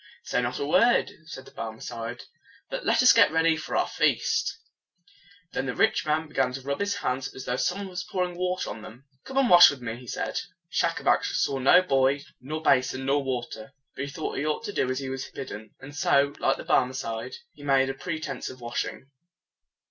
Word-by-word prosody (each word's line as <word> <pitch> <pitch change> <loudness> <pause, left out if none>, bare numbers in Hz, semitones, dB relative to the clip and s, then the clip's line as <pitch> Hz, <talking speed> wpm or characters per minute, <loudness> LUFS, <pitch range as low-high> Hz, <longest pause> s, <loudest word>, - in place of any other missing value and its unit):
"Say - - 0
not 125 0 -2
a - - -2
word," 235 +11 +3
said 145 -5 -9
the - - -14
Barmecide, 115 +1 -6 0.5
"but - - -3
let - - +3
us 250 - +8
get 225 -9 +6
ready 160 0 +3
for 155 -1 -3
the - - +3
feast." - - +1 0.9
Then 135 - -2
the 130 - -3
rich - - +2
man 155 +1 +1
began 135 -4 0
to 135 - -5
rub 140 +1 -3
his 200 0 0
hands 130 -9 -2
as 130 - -8
though 125 - -1
some 180 +8 0
one 200 - -5
was 180 -1 -5
pouring 180 -1 -2
water 180 +1 -2
on 110 - -8
them. 120 +5 -12 0.2
"Come 265 - -6
and 270 -2 +4
wash 175 -3 +10
with 140 - -5
me," 115 -2 -5
he 125 0 -13
said. - - -2 0.3
Schacabac - - +2
saw 135 - 0
no 175 +8 +6
boy, 135 -3 +2 0.2
nor 155 +5 -5
basin, 130 -2 +2
nor 140 +1 +2
water. 120 -4 -5 0.2
But 140 - -3
he - - -7
thought 155 +2 -4
that - - -3
he 145 - -2
ought 155 +8 -1
to 205 -2 -5
do 130 - 0
as 130 - -1
he 135 -1 -4
was 135 0 -5
bidden; 110 -5 -8
and 145 +2 -11
so, 140 0 +3
like - - +2
the - - -8
Barmecide, 125 -3 0 0.2
he - - -16
made 135 -2 +2
a - - -6
pretense 155 -3 -5
of 130 - -11
washing. 120 +3 -4
135 Hz, 215 wpm, -26 LUFS, 125-160 Hz, 0.9 s, wash